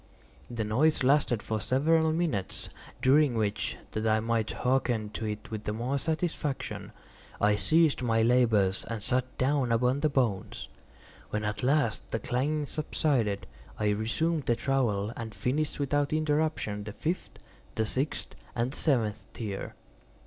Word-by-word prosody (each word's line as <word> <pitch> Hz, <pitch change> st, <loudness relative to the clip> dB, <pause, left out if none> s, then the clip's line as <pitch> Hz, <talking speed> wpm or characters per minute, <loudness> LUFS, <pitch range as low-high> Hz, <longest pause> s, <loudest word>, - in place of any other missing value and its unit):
The 115 Hz, -2 st, -2 dB
noise 130 Hz, +9 st, +2 dB
lasted 130 Hz, -4 st, +3 dB
for 110 Hz, -1 st, -2 dB
several 160 Hz, +6 st, +3 dB
minutes, 155 Hz, -, -2 dB, 0.3 s
during 135 Hz, -1 st, +5 dB
which, 110 Hz, -1 st, -1 dB
that 110 Hz, +1 st, -1 dB
I 110 Hz, 0 st, +3 dB
might 115 Hz, -1 st, 0 dB
hearken 125 Hz, -4 st, 0 dB
to 110 Hz, -, -4 dB
it 105 Hz, +1 st, -5 dB
with 110 Hz, -1 st, -5 dB
the 105 Hz, -, -1 dB
more 125 Hz, +5 st, -1 dB
satisfaction, 155 Hz, -2 st, -2 dB, 0.5 s
I 105 Hz, 0 st, +4 dB
ceased 155 Hz, -, +4 dB
my 115 Hz, -2 st, +2 dB
labors 110 Hz, -6 st, +3 dB
and 115 Hz, -3 st, -4 dB
sat 125 Hz, +2 st, -1 dB
down 130 Hz, -2 st, +1 dB
upon 125 Hz, +4 st, +2 dB
the 155 Hz, -, +2 dB
bones. 120 Hz, -9 st, -1 dB, 0.6 s
When 105 Hz, 0 st, -2 dB
at 105 Hz, 0 st, -2 dB
last 135 Hz, -4 st, +1 dB
the -, -, -1 dB
clanking 145 Hz, +7 st, -1 dB
subsided, 135 Hz, -8 st, 0 dB, 0.3 s
I 105 Hz, -1 st, +1 dB
resumed 130 Hz, +9 st, 0 dB
the 120 Hz, -, +3 dB
trowel, 115 Hz, -5 st, 0 dB
and 110 Hz, -2 st, -6 dB
finished 150 Hz, +5 st, -1 dB
without 145 Hz, +1 st, +1 dB
interruption 155 Hz, -9 st, 0 dB
the 105 Hz, -, -6 dB
fifth, 170 Hz, +10 st, -3 dB, 0.4 s
the 110 Hz, -, +1 dB
sixth, 135 Hz, +7 st, -2 dB, 0.2 s
and 120 Hz, +2 st, 0 dB
the -, -, -8 dB
seventh 110 Hz, -8 st, 0 dB
tier. 100 Hz, -4 st, -5 dB
125 Hz, 150 wpm, -29 LUFS, 110-145 Hz, 0.6 s, during